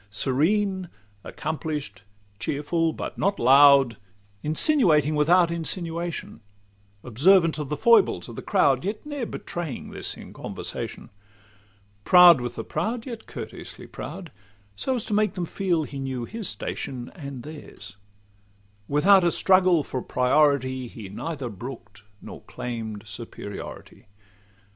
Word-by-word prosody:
Serene, 180 Hz, -, 0 dB, 0.3 s
accomplish'd, 150 Hz, -10 st, -5 dB, 0.4 s
cheerful 160 Hz, +3 st, 0 dB
but -, -, -6 dB
not 200 Hz, +1 st, +1 dB
loud; 135 Hz, -2 st, +6 dB, 0.4 s
Insinuating 155 Hz, -, +3 dB
without 170 Hz, +3 st, +4 dB
insinuation; 170 Hz, -, -4 dB, 0.6 s
Observant 165 Hz, -, +4 dB
of 145 Hz, -3 st, -4 dB
the 150 Hz, -, -2 dB
foibles 235 Hz, +8 st, +4 dB
of -, -, -9 dB
the -, -, -6 dB
crowd, -, -, +2 dB
Yet 205 Hz, +7 st, -4 dB
ne'er 290 Hz, -6 st, -4 dB
betraying 170 Hz, -6 st, -6 dB
this -, -, -4 dB
in -, -, -11 dB
conversation; -, -, -6 dB, 0.9 s
Proud 175 Hz, -, +8 dB
with 120 Hz, 0 st, -4 dB
the -, -, -4 dB
proud, 225 Hz, +9 st, -3 dB
yet 235 Hz, -4 st, -8 dB
courteously -, -, -8 dB
proud, 180 Hz, -4 st, -8 dB, 0.4 s
So 260 Hz, -, -1 dB
as 235 Hz, -, -3 dB
to -, -, -4 dB
make 210 Hz, 0 st, +1 dB
them 180 Hz, -2 st, -2 dB
feel 175 Hz, -2 st, 0 dB
he 140 Hz, -1 st, -7 dB
knew 130 Hz, -3 st, -3 dB
his 225 Hz, -, -4 dB
station 120 Hz, +3 st, -5 dB
And 140 Hz, -8 st, -8 dB
theirs:—without 100 Hz, -, -2 dB
a 175 Hz, -, +4 dB
struggle 185 Hz, -2 st, +4 dB
for 130 Hz, -, -4 dB
priority, 130 Hz, -1 st, +2 dB
He 110 Hz, -4 st, -10 dB
neither 140 Hz, +5 st, -5 dB
brook'd 115 Hz, -2 st, -9 dB, 0.2 s
nor -, -, -9 dB
claim'd 110 Hz, -4 st, -6 dB
superiority. 105 Hz, -2 st, -9 dB
150 Hz, 125 wpm, -25 LUFS, 120-180 Hz, 0.9 s, Proud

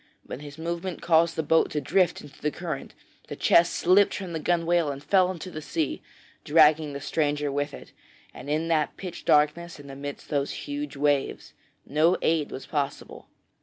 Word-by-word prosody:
But 135 Hz, -, -7 dB
his 145 Hz, 0 st, -10 dB
movement 170 Hz, +2 st, -4 dB
caused 165 Hz, 0 st, +3 dB
the 160 Hz, -, -1 dB
boat 160 Hz, +2 st, +3 dB
to 150 Hz, -, -2 dB
drift 175 Hz, +6 st, +1 dB
into 145 Hz, -1 st, -15 dB
the 150 Hz, -, +1 dB
current, -, -, -6 dB, 0.3 s
the -, -, -6 dB
chest 170 Hz, 0 st, +4 dB
slipped 195 Hz, +3 st, +4 dB
from 185 Hz, -4 st, -6 dB
the 160 Hz, -, -2 dB
gunwale 170 Hz, -1 st, +1 dB
and 140 Hz, 0 st, -6 dB
fell 185 Hz, +3 st, +3 dB
into 185 Hz, 0 st, -6 dB
the 155 Hz, -, -6 dB
sea, 155 Hz, -1 st, -2 dB, 0.4 s
dragging 155 Hz, -1 st, +4 dB
the 140 Hz, -, -5 dB
stranger 145 Hz, 0 st, -1 dB
with 145 Hz, +1 st, -2 dB
it, -, -, -11 dB, 0.4 s
and 130 Hz, +3 st, -9 dB
in 155 Hz, +2 st, 0 dB
that 155 Hz, -3 st, 0 dB
pitch 180 Hz, -3 st, -8 dB
darkness 150 Hz, +3 st, +2 dB
and 140 Hz, -1 st, -11 dB
amidst 140 Hz, +1 st, -8 dB
those 140 Hz, -2 st, -1 dB
huge 290 Hz, -, -5 dB
waves, 145 Hz, -1 st, 0 dB, 0.3 s
no 155 Hz, +5 st, +3 dB
aid 160 Hz, -2 st, +1 dB
was 130 Hz, -, -7 dB
possible. 145 Hz, -3 st, -4 dB
155 Hz, 180 wpm, -26 LUFS, 145-170 Hz, 0.4 s, chest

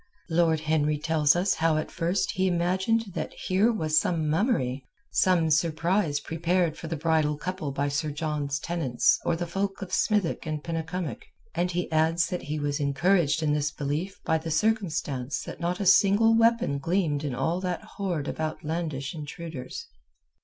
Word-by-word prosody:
Lord 160 Hz, -2 st, +3 dB
Henry 150 Hz, -1 st, +1 dB
tells 150 Hz, -1 st, +3 dB
us 180 Hz, +3 st, +2 dB
how 160 Hz, -1 st, +1 dB
at 155 Hz, -, -3 dB
first 175 Hz, +3 st, 0 dB
he 190 Hz, 0 st, 0 dB
imagined 190 Hz, +5 st, +1 dB
that -, -, -4 dB
here 195 Hz, +5 st, +2 dB
was 155 Hz, -8 st, +2 dB
some 165 Hz, -2 st, -1 dB
mummery, 150 Hz, -, 0 dB, 0.3 s
some 175 Hz, -4 st, +3 dB
surprise 160 Hz, +1 st, +1 dB
prepared 170 Hz, +1 st, 0 dB
for 165 Hz, -, -8 dB
the 165 Hz, -, -2 dB
bridal 155 Hz, -1 st, +1 dB
couple 180 Hz, -2 st, -4 dB
by 140 Hz, +1 st, -1 dB
Sir 145 Hz, +2 st, -1 dB
John's 150 Hz, -2 st, -2 dB
tenants 150 Hz, -8 st, +1 dB
or 170 Hz, -, +1 dB
the 175 Hz, +1 st, -3 dB
folk 195 Hz, +3 st, -2 dB
of 190 Hz, -, -9 dB
Smithick 205 Hz, -6 st, +1 dB
and 155 Hz, -1 st, -3 dB
Penycumwick, 165 Hz, +1 st, -4 dB, 0.3 s
and 180 Hz, -, 0 dB
he 175 Hz, -1 st, -2 dB
adds 160 Hz, +2 st, +3 dB
that 180 Hz, -2 st, -3 dB
he 150 Hz, +1 st, -4 dB
was 145 Hz, 0 st, -1 dB
encouraged 160 Hz, +2 st, +2 dB
in 150 Hz, -1 st, +2 dB
this 150 Hz, 0 st, +1 dB
belief 150 Hz, +7 st, -3 dB
by 160 Hz, 0 st, +2 dB
the 165 Hz, +1 st, -6 dB
circumstance 160 Hz, -, -1 dB
that -, -, -8 dB
not 175 Hz, +1 st, -1 dB
a 200 Hz, -, -1 dB
single 205 Hz, +4 st, +5 dB
weapon 230 Hz, -10 st, +3 dB
gleamed 160 Hz, -2 st, 0 dB
in 140 Hz, -4 st, -2 dB
all 165 Hz, +8 st, -1 dB
that 180 Hz, -2 st, -3 dB
horde 175 Hz, -7 st, -3 dB
of -, -, -5 dB
outlandish 155 Hz, -3 st, -3 dB
intruders. 155 Hz, -2 st, -7 dB
165 Hz, 170 wpm, -27 LUFS, 150-180 Hz, 0.3 s, single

